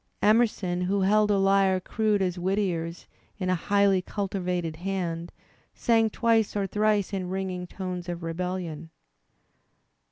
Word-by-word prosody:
Emerson, 210 -5 +2
who 195 +2 +1
held 210 +2 +3
a 205 - +3
lyre 195 -1 +3
crude 210 +1 0
as 180 -1 -2
Whittier's 175 -3 -1 0.3
in 185 -3 -1
a - - +3
highly 200 +1 +2
cultivated 180 -5 -3
hand, 175 -2 -3 0.4
sang 225 -2 +3
twice 225 -1 +1
or 200 -1 0
thrice 210 0 +1
in 185 -2 -2
ringing 185 -1 -3
tones 180 -1 -5
of 175 -1 -5
rebellion. 165 -2 -4
190 Hz, 130 wpm, -27 LUFS, 180-205 Hz, 0.4 s, held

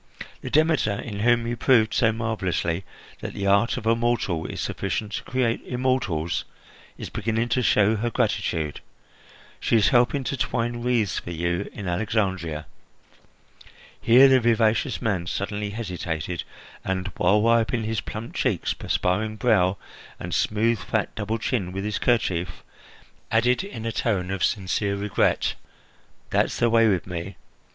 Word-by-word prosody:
The - - -5
Demeter, 155 -8 +3
in 105 -3 -6
whom 120 +1 +3
you 120 +1 -2
proved 115 -2 +3
so 115 -3 +3
marvellously 95 -6 -1 0.4
that - - -6
the 100 - -3
art 100 +5 +3
of 120 - -6
a 115 +1 +4
mortal 115 -8 0
is - - -6
sufficient 105 +2 -3
to - - -4
create 120 -2 0
immortals, 110 -11 -1 0.5
is - - -7
beginning 115 +1 -1
to 125 - +2
show 105 -2 +3
her 120 +3 -1
gratitude. 100 - -1 0.8
She - - +1
is 110 -2 +5
helping 125 +3 +3
to 140 - -2
twine 120 -1 -1
wreaths 120 -4 +1
for - - -9
you 85 +3 -2
in 100 -3 -7
Alexandria." 90 -5 -1 1.4
Here 125 +4 +7
the 130 -1 +5
vivacious 115 +2 +1
man 95 -7 0
suddenly 105 +3 -3
hesitated 90 -6 -4 0.4
and, 95 +1 -2
while 95 +4 +4
wiping 115 +1 +2
his 110 -1 -1
plump 110 +3 -7
cheeks, 110 -10 0
perspiring 105 +4 -1
brow, 100 -5 +2 0.4
and 85 0 -5
smooth, 110 +2 +1
fat 110 -2 -2
double 110 +1 -2
chin 110 -5 -2
with 95 +1 -4
his 105 0 -2
kerchief, 95 -8 0 0.7
added 120 +8 +2
in 195 - -7
a 115 - -1
tone 95 -6 -1
of 95 -1 -2
sincere 100 -1 0
regret: 100 0 +1 0.8
"That's - - +1
the 120 -1 +2
way 115 -1 +5
with 95 -5 +1
me! 90 +1 -5
110 Hz, 150 wpm, -24 LUFS, 95-115 Hz, 1.4 s, Here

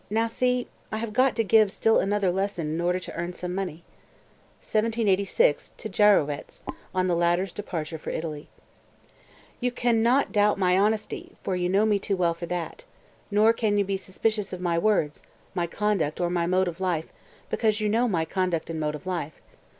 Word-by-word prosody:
Now 225 +2 +1
see, 250 +2 0 0.2
I 220 - -2
have 220 -1 -4
got 255 +3 +3
to 225 - +1
give 215 -1 +4
still 225 +3 +3
another 200 -1 +1
lesson 185 -4 -2
in 160 +2 -2
order 180 +1 +1
to - - -8
earn 175 +1 -4
some 180 0 -5
money." 180 -4 -4 0.8
(1786, 215 -8 +1
to 220 - -6
Gyrowetz, 190 -8 +2 0.3
on 185 0 0
the 180 -2 +1
latter's 175 +2 +1
departure 165 -6 -5
for - - -6
Italy.) 155 -2 -5 1.1
222. - - -2
"You - - 0
can 240 -2 +1
not 250 +5 +3
doubt 210 -1 +3
my 180 -2 +3
honesty, 210 +2 0
for 190 - -1
you 180 0 0
know 200 +3 +3
me 210 -2 +2
too 195 0 -1
well 170 -2 +2
for 170 +1 -7
that. 180 - -4 0.5
Nor 215 +2 +4
can 215 -3 0
you 200 - +2
be 195 0 -1
suspicious 205 +2 -2
of 185 - -5
my 175 -2 0
words, 170 -5 +1 0.3
my 175 -1 -1
conduct 190 -5 -1
or 175 -1 0
my 170 -1 0
mode 185 +1 +2
of 175 +1 -5
life, 170 -4 -1 0.4
because 215 -2 +1
you 215 - 0
know 230 +4 +2
my 170 -7 0
conduct 180 -3 -1
and 160 - -4
mode 150 -1 -1
of 150 - -10
life. 170 -5 -4
190 Hz, 195 wpm, -26 LUFS, 170-215 Hz, 1.1 s, give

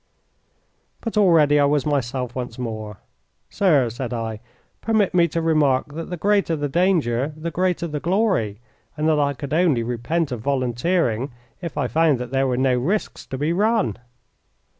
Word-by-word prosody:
But 230 - -4
already 165 -8 +5
I 145 - +5
was 145 -1 +1
myself 130 -4 -1
once 125 -2 -5
more. 110 -4 -5 0.5
"Sir," 150 -11 +3
said 125 +1 -5
I, 115 -2 -4 0.4
"permit 220 -3 +1
me 175 -1 +4
to 165 +1 -2
remark 145 -4 +2
that 165 +2 -6
the 180 - -4
greater 200 -2 +2
the 145 -1 -2
danger 150 -5 +1
the 165 +2 -4
greater 180 +1 0
the 150 -3 -3
glory, 175 - 0 0.4
and 155 +1 0
that 155 -2 +3
I 140 -1 +1
could 140 +2 -6
only 155 -8 +2
repent 125 +7 -2
of 120 -3 -4
volunteering 130 0 0 0.3
if 170 -2 -6
I 140 -4 0
found 155 +3 +3
that 125 0 -6
there 135 0 +1
were 125 -1 0
no 130 -1 +2
risks 190 +12 -2
to 130 - -5
be 150 +5 0
run." 210 - +1
145 Hz, 170 wpm, -22 LUFS, 125-170 Hz, 0.5 s, already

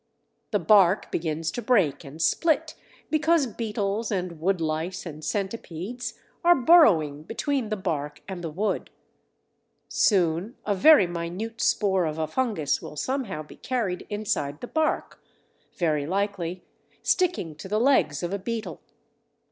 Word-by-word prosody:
The - - +2
bark 200 -2 +4
begins 160 0 -2
to 240 - -4
break 195 - +2
and 145 +3 -11
split 315 - +2 0.4
because 315 0 +3
beetles 215 -2 -2
and 180 -4 -3
woodlice 165 0 -1
and 155 -2 -8
centipedes 200 +3 -4 0.3
are 350 0 +7
burrowing 205 - +5
between 235 - -2
the 215 - -1
bark 150 -5 -3
and 185 -2 -6
the 165 - -3
wood. 195 +8 -2 1.0
Soon 185 +3 +2
a 205 - +1
very 240 +4 +7
minute 175 +6 -5
spore 190 -4 +2
of 155 0 -4
a 160 - 0
fungus 170 - -1
will - - -9
somehow 230 - -3
be 150 - -15
carried 220 -8 -2
inside 180 -9 -2
the 245 - -5
bark, 315 +2 -1 0.5
very 155 -4 0
likely 185 -2 -2 0.4
sticking 345 - +1
to 190 - -8
the 210 +2 +1
legs 180 - +3
of 175 +2 -2
a 200 - -2
beetle. 225 +3 -5
190 Hz, 140 wpm, -26 LUFS, 160-230 Hz, 1.0 s, are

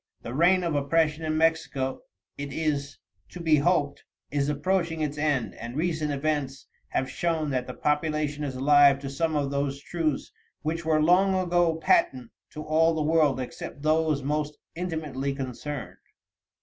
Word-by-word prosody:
The 115 - -6
reign 180 +6 +4
of 170 -2 -1
oppression 150 +2 +1
in 155 0 -1
Mexico, 155 -5 0 0.3
it 145 0 -6
is 145 -2 -2 0.3
to 180 - -10
be 160 -3 +3
hoped, 145 -2 +1 0.3
is 140 0 0
approaching 165 +2 0
its 150 -1 -1
end, 145 -8 0
and 115 +2 -8
recent 160 -2 -1
events 140 -2 -2 0.2
have 130 - -1
shown 160 -1 -1
that 125 -1 -1
the 125 - -6
population 150 0 -1
is 135 -3 -3
alive 140 +1 +6
to 135 -1 -5
some 160 +3 -1
of 140 -2 0
those 140 0 -1
truths 155 0 -2 0.3
which 165 +2 -2
were 155 -1 +3
long 190 +4 +4
ago 175 -2 +2
patent 130 -6 +1 0.2
to 155 - -7
all 160 +2 +3
the 155 - 0
world 150 -3 +3
except 130 +2 -7
those 155 -2 +2
most 150 +1 -2 0.2
intimately 155 -6 -3
concerned. 135 +1 -6
150 Hz, 160 wpm, -26 LUFS, 140-160 Hz, 0.3 s, alive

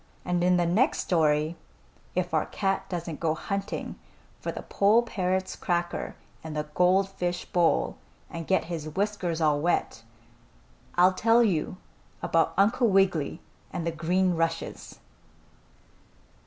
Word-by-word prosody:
And 175 -1 0
in 180 0 +4
the 175 - +2
next 215 - +2
story, 155 -1 +1 0.6
if - - -1
our - - +1
cat 195 -1 -1
doesn't 170 -3 -4
go 160 -2 0
hunting 200 +4 -4 0.4
for - - -3
the - - -7
poll 215 +4 +3
parrot's 185 -4 -1
cracker 175 -1 -2 0.3
in 160 -1 -6
the 150 - -1
gold 185 +3 +3
fish 180 -2 -3
bowl 165 - +1 0.3
and 165 -1 -7
get 190 - +2
his 160 -3 -5
whiskers 185 -2 -2
all 150 -2 +3
wet, 170 -8 0 0.9
I'll 180 +1 +5
tell 230 +5 +4
you 185 -3 0 0.5
about 165 -1 +2
Uncle 225 +5 +4
Wiggily 190 -7 +2 0.3
and 170 - -4
the 170 - 0
green 180 +3 +1
rushes. 165 0 -3
175 Hz, 135 wpm, -27 LUFS, 165-195 Hz, 0.9 s, I'll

